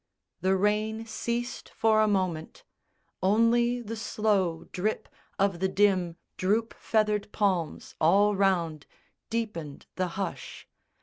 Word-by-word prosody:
The 190 +1 +2
rain 215 +3 0
ceased 235 +2 -3
for 220 -1 +3
a 215 - +4
moment: 185 - -1 0.6
only 235 +5 +3
the 230 0 -5
slow 200 -6 0
Drip 210 +4 -2 0.3
of 195 -3 +1
the 190 - +2
dim 190 -3 +2 0.2
droop 215 +5 +1
feathered 210 -2 0
palms 185 -6 -1
all 200 +6 +4
round 170 -6 +1 0.4
Deepened 210 -11 -4
the 185 -1 +1
hush. 195 -4 -5
205 Hz, 115 wpm, -28 LUFS, 185-220 Hz, 0.6 s, a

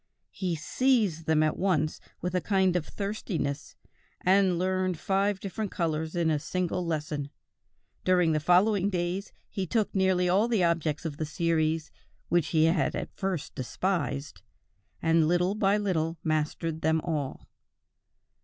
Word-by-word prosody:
He 180 -3 -2
seized 195 - +1
them 155 -1 +4
at 155 - 0
once 160 -5 0 0.2
with 180 +1 -2
a 180 - +1
kind 190 -2 +2
of 170 -3 -1
thirstiness, 195 -8 -3 0.5
and 190 -1 +3
learned 185 0 0
five 195 +2 0
different 205 +2 -4
colors 160 -2 -2
in 170 -2 +2
a 150 - +1
single 180 +3 -2
lesson; 150 -3 -3 0.7
during 180 -3 +3
the 155 - +2
following 190 +5 +3
days 180 +1 -2 0.2
he 190 -2 -4
took 215 +4 0
nearly 190 -2 +2
all 195 +6 +3
the 225 -6 +2
objects 165 -3 0
of 150 -3 -4
the 155 - -2
series 160 -1 0 0.4
which 175 -3 +2
he 155 -2 +3
had 165 0 +2
at - - -5
first 190 -6 -3
despised, 145 - -2 0.6
and 165 -1 +4
little 175 +3 +2
by 205 -1 +2
little 170 -5 -1
mastered 155 +1 -1
them 160 +1 +2
all. 150 -6 -3
175 Hz, 145 wpm, -28 LUFS, 155-190 Hz, 0.7 s, them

